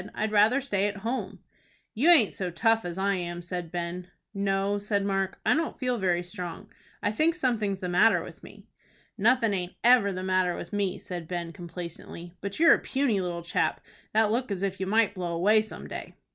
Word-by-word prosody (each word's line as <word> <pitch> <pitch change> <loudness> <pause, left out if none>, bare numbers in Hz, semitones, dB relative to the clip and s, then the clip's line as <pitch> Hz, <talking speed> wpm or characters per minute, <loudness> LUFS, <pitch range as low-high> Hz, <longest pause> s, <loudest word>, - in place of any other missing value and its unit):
"I'd 215 0 -1
rather 215 +6 +4
stay 205 -7 0
at 205 0 -4
home." 250 +3 -3 0.5
"You 275 +10 +3
aint 290 - +6
so 185 -2 -3
tough 225 +6 +2
as 175 0 -5
I 200 +1 +1
am," 175 -1 -5
said 175 -2 -5
Ben. 175 +1 -4 0.3
"No," 195 0 0
said 200 -1 -1
Mark, 195 -1 -1
"I 230 - +5
don't 325 +1 -1
feel 250 -2 -1
very 175 -2 +1
strong. 180 -2 -6 0.3
I 205 - +1
think 315 +9 +2
something's 215 - -1
the 180 - -2
matter 195 +6 +4
with - - -11
me." - - -14 0.5
"Nothin' 230 0 +3
aint 180 -2 -3
ever 240 -4 +5
the 185 0 -4
matter 185 -1 +1
with - - -8
me," 200 -2 0
said 175 -3 -7
Ben, 170 -1 -4
complacently; 170 -1 -8
"but 200 +1 -5
you're 335 0 +8
a - - +2
puny 260 -8 0
little 175 -1 -4
chap, 170 - 0 0.3
that 215 -1 +3
look 245 +2 -1
as 195 -1 -3
if 195 -1 -2
you 190 - -2
might 215 0 +3
blow 175 -3 -3
away 210 +6 +4
some 215 - -8
day." - - -8
200 Hz, 200 wpm, -27 LUFS, 180-220 Hz, 0.5 s, you're